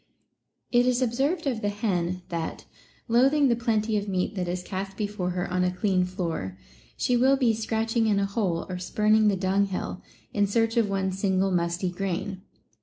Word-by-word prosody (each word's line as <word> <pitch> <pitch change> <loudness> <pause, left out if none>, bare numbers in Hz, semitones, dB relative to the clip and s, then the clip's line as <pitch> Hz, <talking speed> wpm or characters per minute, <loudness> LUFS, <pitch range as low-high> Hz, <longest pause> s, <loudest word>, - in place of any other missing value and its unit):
It 245 0 +4
is 250 -1 +2
observed 265 +8 0
of 245 -5 -1
the 205 - 0
hen 185 -4 -1
that, 165 -2 -4 0.4
loathing 270 +4 +4
the 235 - +3
plenty 220 -2 +1
of 205 - -6
meat 185 +1 -1
that 185 -3 -3
is 180 +1 -3
cast 195 +1 -5
before 205 -3 -2
her 180 +1 -2
on 180 0 +1
a 180 - +2
clean 185 0 +1
floor, 165 - -4 0.4
she 250 - +1
will 265 +3 +4
be 245 -4 +3
scratching 225 +1 0
in 205 -2 +2
a 200 - +2
hole 195 -5 -1
or 180 -1 -5
spurning 215 +4 +3
the 205 - +3
dunghill, 190 0 -1 0.3
in 205 -1 +2
search 225 +2 +1
of 230 -3 +2
one 190 -1 0
single 190 0 +1
musty 175 +1 0
grain. 190 +1 -3
200 Hz, 180 wpm, -26 LUFS, 180-225 Hz, 0.4 s, It